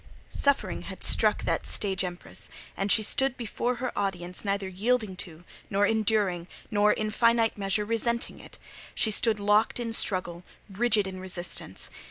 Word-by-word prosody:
Suffering 280 Hz, -1 st, +1 dB
had -, -, -7 dB
struck -, -, +3 dB
that -, -, -1 dB
stage 190 Hz, -2 st, -1 dB
empress; 180 Hz, -1 st, -6 dB, 0.3 s
and 195 Hz, +1 st, 0 dB
she 220 Hz, -, +6 dB
stood 265 Hz, +4 st, +2 dB
before 240 Hz, +1 st, -2 dB
her 250 Hz, +1 st, -4 dB
audience 180 Hz, -3 st, -2 dB
neither 200 Hz, -1 st, -1 dB
yielding 210 Hz, +2 st, 0 dB
to, 170 Hz, -1 st, -6 dB, 0.3 s
nor 200 Hz, +1 st, +3 dB
enduring, 205 Hz, -5 st, +1 dB, 0.2 s
nor, 210 Hz, 0 st, +4 dB
in 215 Hz, 0 st, -1 dB
finite 230 Hz, 0 st, +3 dB
measure, 200 Hz, +1 st, 0 dB
resenting 235 Hz, +1 st, -1 dB
it: -, -, -12 dB, 0.4 s
she 220 Hz, -, +3 dB
stood 215 Hz, 0 st, +2 dB
locked 210 Hz, +3 st, +3 dB
in 230 Hz, -1 st, -3 dB
struggle, 180 Hz, -5 st, 0 dB, 0.2 s
rigid 215 Hz, 0 st, +2 dB
in 190 Hz, -1 st, -6 dB
resistance. 180 Hz, -, -4 dB
210 Hz, 155 wpm, -28 LUFS, 190-230 Hz, 0.4 s, she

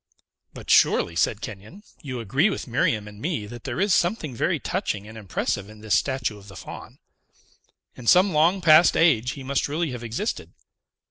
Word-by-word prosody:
"But, -, -, -5 dB
surely," 85 Hz, -, +4 dB
said 105 Hz, +5 st, 0 dB
Kenyon, 110 Hz, -, -9 dB, 0.2 s
"you 130 Hz, -6 st, -6 dB
agree 135 Hz, -, +1 dB
with 200 Hz, -, -4 dB
Miriam 115 Hz, -4 st, 0 dB
and 105 Hz, 0 st, -12 dB
me 150 Hz, -9 st, -2 dB
that 120 Hz, +3 st, -11 dB
there 130 Hz, +5 st, -4 dB
is 200 Hz, 0 st, +2 dB
something 175 Hz, -, 0 dB
very 115 Hz, -, 0 dB
touching 100 Hz, +1 st, -3 dB
and 110 Hz, -, -11 dB
impressive 100 Hz, -1 st, -3 dB
in 110 Hz, 0 st, -14 dB
this 110 Hz, -1 st, -2 dB
statue 130 Hz, -6 st, 0 dB
of 100 Hz, -, -16 dB
the 100 Hz, -, -12 dB
Faun. -, -, -10 dB, 1.0 s
In 120 Hz, -, -10 dB
some 185 Hz, -, +5 dB
long 170 Hz, +5 st, +3 dB
past 160 Hz, 0 st, +6 dB
age, 125 Hz, -7 st, +3 dB
he 140 Hz, -, -9 dB
must 140 Hz, +1 st, -1 dB
really 155 Hz, +1 st, -2 dB
have 125 Hz, -1 st, -7 dB
existed. 120 Hz, -, -4 dB
125 Hz, 185 wpm, -24 LUFS, 110-165 Hz, 1.0 s, past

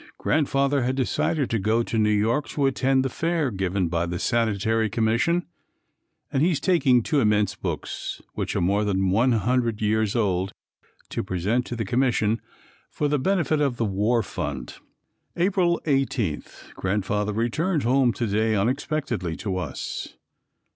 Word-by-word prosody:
Grandfather 140 Hz, -2 st, +1 dB
had 130 Hz, +2 st, 0 dB
decided 135 Hz, +2 st, 0 dB
to 115 Hz, -, +1 dB
go 110 Hz, +4 st, +1 dB
to 115 Hz, -, -4 dB
New 105 Hz, 0 st, +3 dB
York 110 Hz, +7 st, +1 dB
to 145 Hz, -, 0 dB
attend 135 Hz, 0 st, +2 dB
the -, -, +2 dB
fair 160 Hz, 0 st, -1 dB
given 95 Hz, -2 st, -1 dB
by 85 Hz, +1 st, -1 dB
the 90 Hz, +1 st, -3 dB
Sanitary 110 Hz, +1 st, +1 dB
Commission, 115 Hz, -, +1 dB, 0.9 s
and 135 Hz, -, +2 dB
he 165 Hz, -, +4 dB
is 165 Hz, -, 0 dB
taking 140 Hz, -, +3 dB
two 150 Hz, +2 st, +1 dB
immense 105 Hz, -4 st, +2 dB
books, -, -, -5 dB
which -, -, -3 dB
are -, -, +1 dB
more 100 Hz, +4 st, +2 dB
than 95 Hz, -2 st, +1 dB
one 120 Hz, +6 st, +3 dB
hundred 115 Hz, 0 st, +1 dB
years 110 Hz, 0 st, +1 dB
old, 95 Hz, -4 st, 0 dB, 0.6 s
to -, -, -2 dB
present 100 Hz, +6 st, -1 dB
to 120 Hz, -, -4 dB
the 115 Hz, -2 st, -3 dB
Commission, 115 Hz, -1 st, +1 dB, 0.5 s
for 150 Hz, -, -1 dB
the 145 Hz, 0 st, +1 dB
benefit 155 Hz, -2 st, +1 dB
of 135 Hz, -4 st, +1 dB
the 115 Hz, -, 0 dB
war 105 Hz, +4 st, +1 dB
fund. -, -, -5 dB, 0.6 s
April 175 Hz, -1 st, +2 dB
18. 135 Hz, -, 0 dB, 0.3 s
Grandfather 105 Hz, +2 st, -1 dB
returned 140 Hz, -, 0 dB
home 125 Hz, +1 st, +3 dB
to 120 Hz, -, -2 dB
day, 110 Hz, +1 st, +1 dB
unexpectedly 120 Hz, -, -1 dB
to 95 Hz, 0 st, -3 dB
us. 80 Hz, -7 st, -5 dB
115 Hz, 155 wpm, -24 LUFS, 105-135 Hz, 0.9 s, he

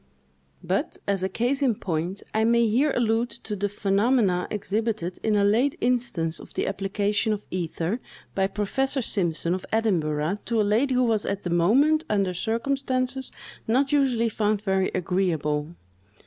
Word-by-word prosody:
But, -, -, -1 dB
as 200 Hz, -2 st, +1 dB
a 190 Hz, -, 0 dB
case 245 Hz, +8 st, 0 dB
in 255 Hz, -5 st, +3 dB
point, 175 Hz, +1 st, -3 dB
I 220 Hz, -, +2 dB
may 235 Hz, +1 st, +4 dB
here 265 Hz, +7 st, +2 dB
allude 230 Hz, 0 st, +1 dB, 0.2 s
to 210 Hz, -, -3 dB
the 205 Hz, +1 st, -1 dB
phenomena 200 Hz, -1 st, +1 dB
exhibited 210 Hz, -3 st, -2 dB
in 220 Hz, -1 st, +1 dB
a 205 Hz, -, +3 dB
late 230 Hz, +8 st, +3 dB
instance 235 Hz, -10 st, 0 dB
of -, -, -13 dB
the -, -, 0 dB
application 205 Hz, +2 st, 0 dB
of 210 Hz, 0 st, -5 dB
ether, 175 Hz, +4 st, -2 dB, 0.3 s
by 190 Hz, -1 st, +1 dB
Professor 265 Hz, +7 st, -1 dB
Simpson, 170 Hz, -4 st, 0 dB
of 185 Hz, -, -3 dB
Edinburgh, 175 Hz, -5 st, 0 dB
to 230 Hz, -2 st, 0 dB
a -, -, +4 dB
lady 235 Hz, +6 st, +2 dB
who 250 Hz, -, +3 dB
was 225 Hz, -3 st, +1 dB
at 200 Hz, 0 st, -3 dB
the 175 Hz, -, -3 dB
moment 270 Hz, -, +4 dB
under 195 Hz, -3 st, +1 dB
circumstances 255 Hz, +5 st, -1 dB, 0.4 s
not 265 Hz, +5 st, +2 dB
usually 260 Hz, -5 st, +2 dB
found 210 Hz, -1 st, 0 dB
very 190 Hz, -2 st, +1 dB
agreeable. 170 Hz, -4 st, -1 dB
210 Hz, 160 wpm, -25 LUFS, 185-240 Hz, 0.4 s, may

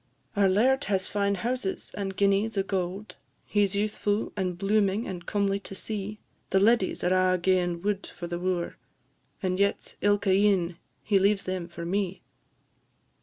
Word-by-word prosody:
"Our 200 Hz, -1 st, +4 dB
laird 255 Hz, +8 st, +3 dB
has 195 Hz, -2 st, 0 dB
fine 200 Hz, -1 st, 0 dB
houses, 230 Hz, 0 st, -3 dB
and 195 Hz, -1 st, -3 dB
guineas 200 Hz, +2 st, +2 dB
o' 195 Hz, -, +3 dB
gowd 190 Hz, +1 st, -3 dB, 0.3 s
He 205 Hz, -1 st, +2 dB
's 195 Hz, -, -4 dB
youthfu', 210 Hz, 0 st, 0 dB
he 195 Hz, -, -1 dB
's -, -, -8 dB
blooming, 200 Hz, +2 st, +1 dB
and 180 Hz, -2 st, -6 dB
comely 200 Hz, -1 st, +1 dB
to 195 Hz, -, -9 dB
see. 210 Hz, +1 st, -4 dB, 0.3 s
The 195 Hz, -, +2 dB
leddies 205 Hz, 0 st, +3 dB
are 185 Hz, 0 st, +3 dB
a' -, -, 0 dB
ga'en 175 Hz, -1 st, +1 dB
wud 200 Hz, -1 st, -1 dB
for 175 Hz, -, -8 dB
the 175 Hz, 0 st, -4 dB
wooer, 180 Hz, -1 st, -2 dB, 0.7 s
And 185 Hz, 0 st, 0 dB
yet, 200 Hz, 0 st, 0 dB
ilka 205 Hz, -1 st, +3 dB
e'ening, 190 Hz, -3 st, +3 dB, 0.3 s
he 200 Hz, -3 st, +3 dB
leaves 200 Hz, +1 st, +2 dB
them 185 Hz, -2 st, -3 dB
for 170 Hz, -1 st, -7 dB
me. 190 Hz, +1 st, -2 dB
195 Hz, 170 wpm, -27 LUFS, 185-205 Hz, 0.7 s, Our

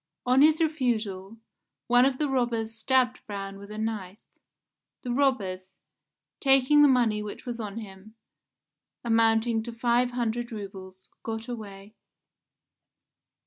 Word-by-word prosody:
On 255 Hz, +2 st, +4 dB
his 310 Hz, +1 st, +5 dB
refusal 230 Hz, -, -1 dB, 0.5 s
one 245 Hz, +1 st, +5 dB
of 265 Hz, -1 st, +1 dB
the 300 Hz, -, 0 dB
robbers 235 Hz, -4 st, -1 dB
stabbed 250 Hz, +2 st, +1 dB
Braun 195 Hz, -1 st, -6 dB
with 200 Hz, 0 st, -11 dB
a 210 Hz, -, -8 dB
knife. 215 Hz, -3 st, -4 dB, 0.9 s
The 245 Hz, -, -3 dB
robbers, 195 Hz, -9 st, -1 dB, 0.6 s
taking 270 Hz, +1 st, +4 dB
the 295 Hz, -, +8 dB
money 235 Hz, -5 st, +2 dB
which 210 Hz, -1 st, -8 dB
was 240 Hz, -1 st, -5 dB
on 210 Hz, -1 st, -5 dB
him, 210 Hz, 0 st, -10 dB, 0.9 s
amounting 225 Hz, 0 st, +2 dB
to 235 Hz, +2 st, -7 dB
500 240 Hz, 0 st, 0 dB
roubles, 190 Hz, -3 st, -9 dB
got 225 Hz, 0 st, -5 dB
away. 205 Hz, -4 st, -8 dB
225 Hz, 120 wpm, -27 LUFS, 205-250 Hz, 0.9 s, the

